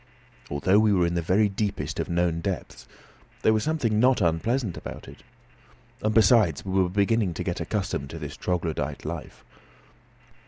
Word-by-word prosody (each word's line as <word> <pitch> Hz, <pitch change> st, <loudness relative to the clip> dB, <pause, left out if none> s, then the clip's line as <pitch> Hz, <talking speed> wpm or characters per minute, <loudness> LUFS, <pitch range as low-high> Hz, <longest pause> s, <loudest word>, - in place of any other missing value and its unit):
Although 95 Hz, +8 st, +3 dB
we 110 Hz, -1 st, +4 dB
were 90 Hz, -3 st, +3 dB
in 85 Hz, -, -1 dB
the 85 Hz, -, 0 dB
very 95 Hz, +6 st, +3 dB
deepest 100 Hz, +1 st, -3 dB
of -, -, -2 dB
known 85 Hz, -1 st, +1 dB
depths, 95 Hz, -1 st, -5 dB, 0.6 s
there 110 Hz, -, +5 dB
was 110 Hz, -1 st, +1 dB
something 125 Hz, -9 st, 0 dB
not 125 Hz, +2 st, +4 dB
unpleasant 95 Hz, +6 st, 0 dB
about -, -, -8 dB
it. -, -, -13 dB, 0.8 s
And, 110 Hz, -, +1 dB
besides, 105 Hz, -, +4 dB
we 95 Hz, 0 st, +1 dB
were 90 Hz, -, +1 dB
beginning 100 Hz, -1 st, +1 dB
to -, -, -3 dB
get -, -, -3 dB
accustomed 70 Hz, 0 st, -3 dB
to 80 Hz, -, -7 dB
this 75 Hz, -1 st, -7 dB
troglodyte 85 Hz, -2 st, -3 dB
life. -, -, -7 dB
95 Hz, 165 wpm, -26 LUFS, 85-110 Hz, 0.8 s, there